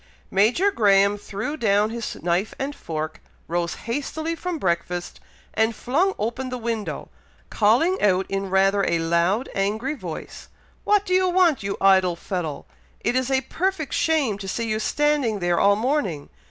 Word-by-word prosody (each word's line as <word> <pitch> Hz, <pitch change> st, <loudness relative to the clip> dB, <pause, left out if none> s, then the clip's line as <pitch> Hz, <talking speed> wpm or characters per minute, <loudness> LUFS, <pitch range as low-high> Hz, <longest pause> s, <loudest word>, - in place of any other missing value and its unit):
Major 240 Hz, -, +3 dB
Graham 200 Hz, -, +4 dB
threw 205 Hz, +7 st, -5 dB
down 210 Hz, -4 st, +2 dB
his 230 Hz, -1 st, -4 dB
knife 175 Hz, +4 st, 0 dB
and 275 Hz, +2 st, -3 dB
fork 155 Hz, -1 st, -5 dB, 0.3 s
rose 170 Hz, 0 st, -1 dB
hastily 290 Hz, +7 st, -3 dB
from 345 Hz, +1 st, -4 dB
breakfast 175 Hz, -, -2 dB, 0.3 s
and 220 Hz, +1 st, +1 dB
flung 340 Hz, -, +1 dB
open 240 Hz, +4 st, -3 dB
the 250 Hz, -, -4 dB
window, 220 Hz, -9 st, -4 dB, 0.4 s
calling 255 Hz, -, +3 dB
out 190 Hz, -2 st, +3 dB
in 195 Hz, 0 st, -3 dB
rather 195 Hz, +1 st, +3 dB
a 170 Hz, -, +2 dB
loud, 170 Hz, +8 st, +1 dB
angry 215 Hz, +8 st, -1 dB
voice, 180 Hz, -, -8 dB, 0.4 s
"What 415 Hz, -1 st, +3 dB
do 365 Hz, -, -1 dB
you 370 Hz, 0 st, +3 dB
want, 355 Hz, -5 st, +3 dB
you 200 Hz, 0 st, -3 dB
idle 190 Hz, -2 st, +4 dB
fellow? 170 Hz, -4 st, -4 dB, 0.4 s
It 240 Hz, -, 0 dB
is 260 Hz, 0 st, +1 dB
a 265 Hz, -1 st, +2 dB
perfect 360 Hz, -2 st, -2 dB
shame 305 Hz, -11 st, +1 dB
to 195 Hz, -, -6 dB
see 230 Hz, +4 st, -2 dB
you 215 Hz, 0 st, -1 dB
standing 290 Hz, -3 st, +1 dB
there 175 Hz, -2 st, +1 dB
all 200 Hz, 0 st, +5 dB
morning! 220 Hz, -, -1 dB
215 Hz, 160 wpm, -23 LUFS, 190-285 Hz, 0.4 s, all